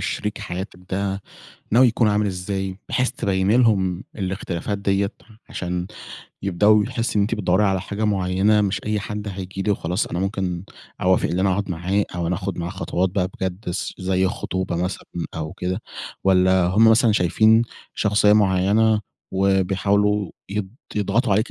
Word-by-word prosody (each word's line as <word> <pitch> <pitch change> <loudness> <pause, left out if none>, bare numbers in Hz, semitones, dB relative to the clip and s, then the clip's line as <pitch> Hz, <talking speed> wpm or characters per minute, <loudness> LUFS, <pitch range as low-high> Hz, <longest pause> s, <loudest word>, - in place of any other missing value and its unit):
شريك 105 0 -3
حياتك 95 -1 -6
ده، 100 0 -2 0.5
ناوي 125 +3 +6
يكون 115 0 +2
عامل 105 0 +2
إزاي، 95 0 -3
بحيث 125 +1 +1
تبيني 100 0 +1
لهم 95 -7 +2
الاختلافات 95 0 -3
ديّة 100 +1 0 0.4
عشان 90 0 -3 0.6
يبدؤوا 105 +3 +4
يحسوا 120 -3 -2
إن - - +4
أنتِ 105 +3 +1
بتدوري 95 0 +2
على 95 -1 +1
حاجة 100 +3 -3
مُعينة، 100 +1 +2
مش 100 -1 0
أي 105 -1 0
حد 105 0 -5
هييجي 95 0 -5
لي 105 - 0
وخلاص 90 0 -1
أنا 85 - -4
مُمكن 95 -2 -2 0.4
أوافق، 90 0 +3
اللي 90 +2 -1
أنا 95 - +3
أقعد 95 +1 -1
معاه 95 +4 0
أو 85 -1 -2
أنا 90 - 0
آخد 95 -1 -4
معاه 85 +1 -3
خطوات 95 -1 -1
بقى 90 -1 0
بجد 95 0 -3
س 90 - -3
زي 95 0 +1
خطوبة 95 -2 -3
مثلًا، 90 +1 -3 0.3
أو 80 -1 -4
كده 90 +4 -3 0.4
والّا 95 -1 +4
هُم 105 +5 +5
مثلًا 110 0 +5
شايفين 110 +5 +4 0.3
شخصية 105 0 +3
معينة 105 +2 +3 0.3
وبيحاولوا 100 +1 +1 0.2
يض 100 -1 -3 0.3
يضغطوا 105 +2 +1
عليكِ 110 +4 +1
95 Hz, 160 wpm, -22 LUFS, 90-105 Hz, 0.6 s, ناوي